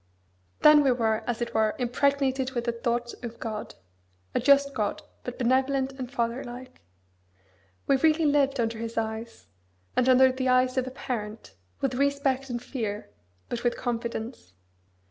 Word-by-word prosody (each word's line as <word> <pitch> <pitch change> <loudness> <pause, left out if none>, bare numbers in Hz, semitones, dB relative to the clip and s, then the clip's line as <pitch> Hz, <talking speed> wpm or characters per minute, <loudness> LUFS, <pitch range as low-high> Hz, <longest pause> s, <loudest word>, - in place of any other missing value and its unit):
Then 300 -1 +8
we 270 - +4
were, 225 -3 +1
as 240 -1 -1
it 235 - -6
were, 220 -1 +2
impregnated 265 +1 +1
with 240 -2 -1
the 235 - 0
thought 240 0 -2
of 235 -1 -7
God 215 -2 -5 0.6
a - - +2
just 280 +2 +4
God, 210 -4 -2 0.2
but 245 - -6
benevolent 265 +2 +1
and 260 -2 -7
fatherlike. 245 +1 -4 1.0
We 275 - +3
really 315 +3 +3
lived 280 -2 +2
under 225 -1 -1
His 230 0 -5
eyes, 225 +1 -4 0.5
as 255 - +3
under 260 0 +6
the 260 0 -2
eyes 255 0 +3
of 260 -1 0
a - - -2
parent, 225 -4 -6 0.3
with 270 -2 0
respect 275 0 0
and 240 -1 -2
fear, 220 - -5 0.4
but 240 -1 -4
with 240 -1 +1
confidence. 230 - -4
250 Hz, 155 wpm, -27 LUFS, 230-270 Hz, 1.0 s, Then